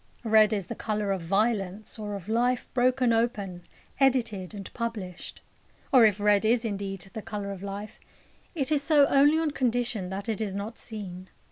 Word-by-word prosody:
Red 220 -1 +5
is 200 -4 -1
the - - -5
colour 210 -2 -2
of 190 -2 -1
violence, 200 +3 -1
or 205 -1 -4
of 195 -1 -8
life 245 +3 +1
broken 255 -1 +3
open, 200 -6 -1 0.3
edited, 230 -8 +1
and 195 -2 -8
published. 215 -7 -5 0.5
Or 250 -4 +8
if 210 -2 +3
red 205 -1 +3
is 230 +2 +2
indeed 195 -3 -4
the 220 - -5
colour 205 -2 -5
of 195 -2 -7
life, 200 +1 -7 0.6
it 290 -2 -1
is 295 -2 +3
so 290 -1 +5
only 285 +3 +4
on 320 -2 0
condition 245 -7 -1
that 195 +3 -5
it 220 -2 -2
is 200 -3 -2
not 205 +3 -5
seen. 190 -5 -7
215 Hz, 175 wpm, -27 LUFS, 195-240 Hz, 0.6 s, Or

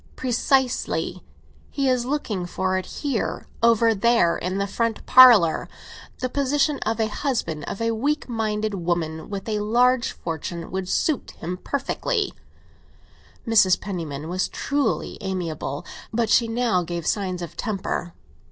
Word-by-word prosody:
"Precisely. 260 +1 0 0.5
He 275 -1 -1
is 250 -1 +1
looking 220 -11 -2
for 185 +1 -1
it 185 - -2
here—over 230 -3 +1
there 220 -5 +3
in 185 +2 -3
the 200 - 0
front 230 +2 -2
parlour. 240 -10 +7 0.5
The 255 - +1
position 280 +2 +1
of 225 +1 -1
husband 220 - -2
of - - -5
a 230 0 +1
weak 290 +7 -1
minded 215 -3 -1
woman 170 -3 -2
with 200 0 -5
a 215 -1 -1
large 240 +4 +2
fortune 165 +1 -5
would 190 -1 -3
suit 305 +5 0
him 175 +2 -4
to - - -27
perfection!" 400 - -1 1.2
Mrs. 205 -5 +5
Penniman 160 -7 -5
was 180 +1 -1
truly 285 0 -1
amiable, 170 -7 -4 0.3
but 225 -1 0
she 235 - +4
now 225 -4 +1
gave 170 -1 -4
signs 185 -4 -1
of 170 - -8
temper. 190 -4 -3
215 Hz, 135 wpm, -24 LUFS, 180-245 Hz, 1.2 s, parlour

